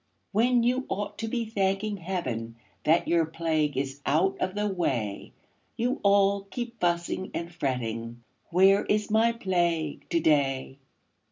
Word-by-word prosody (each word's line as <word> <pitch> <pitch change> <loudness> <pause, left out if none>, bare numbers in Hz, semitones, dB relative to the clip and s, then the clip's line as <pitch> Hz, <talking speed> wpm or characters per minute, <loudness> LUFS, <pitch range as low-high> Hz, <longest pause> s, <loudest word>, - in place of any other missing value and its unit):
When 235 +3 +3
you 255 +2 +1
ought 205 +2 -4
to 225 - -2
be 235 +1 -1
thanking 200 0 -1
Heaven 130 -11 -4 0.3
That 160 +3 +3
your 170 -1 +3
plague 160 -3 -1
is 135 +1 -3
out 170 +7 +2
of 185 +1 -2
the 210 0 0
way, 130 - -2 0.5
You 250 +4 0
all 200 0 +3
keep 240 0 -5
fussing 175 +1 -1
and 170 +1 -4
fretting 120 -5 -3 0.3
"Where 190 +3 +5
is 210 0 0
my 225 +2 +4
Plague 175 -8 -1
to 170 - +2
day?" 135 -3 +1
175 Hz, 145 wpm, -27 LUFS, 145-205 Hz, 0.5 s, Where